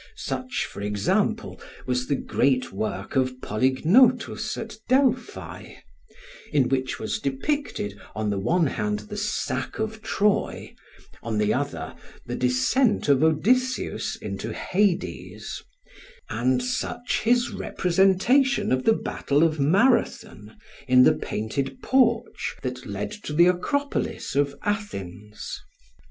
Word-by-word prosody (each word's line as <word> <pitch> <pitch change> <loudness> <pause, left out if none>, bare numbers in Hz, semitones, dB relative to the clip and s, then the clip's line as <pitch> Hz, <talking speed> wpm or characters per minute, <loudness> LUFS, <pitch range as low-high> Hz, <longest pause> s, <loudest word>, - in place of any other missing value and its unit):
Such, 255 -1 -3
for - - -9
example, 105 -1 -1 0.2
was 125 0 -1
the 145 - +1
great 130 -1 +1
work 100 +1 -4
of 130 -1 +1
Polygnotus 210 - +2
at 220 -1 -6
Delphi, 260 -1 0 0.8
in 135 -4 +2
which 130 -1 -1
was 220 - -3
depicted 135 - -2 0.2
on 105 0 -1
the 100 - -1
one 170 - +2
hand 210 +8 -1
the 210 -1 -9
sack 145 -11 -2
of 220 0 -3
Troy, 205 0 0 0.5
on 115 -2 -3
the 105 0 +2
other 85 - -3 0.3
the 120 - -4
descent 135 - +2
of 140 +1 +4
Odysseus 250 - +1
into - - -5
Hades; 195 -1 -1 0.7
and 125 +1 +1
such 245 -1 -2
his 240 +2 +2
representation 195 +10 +2
of 130 0 +1
the 225 - +6
battle 145 -7 0
of 160 -2 +1
Marathon, 160 - +1 0.3
in 125 0 +7
the - - +6
painted 135 - -3
porch 235 -3 +1
that 125 0 -5
led 100 0 -4
to 210 -7 -7
the 170 +3 +6
Acropolis 280 - -1
of 140 0 +1
Athens. 105 - -5
155 Hz, 120 wpm, -25 LUFS, -, 0.8 s, in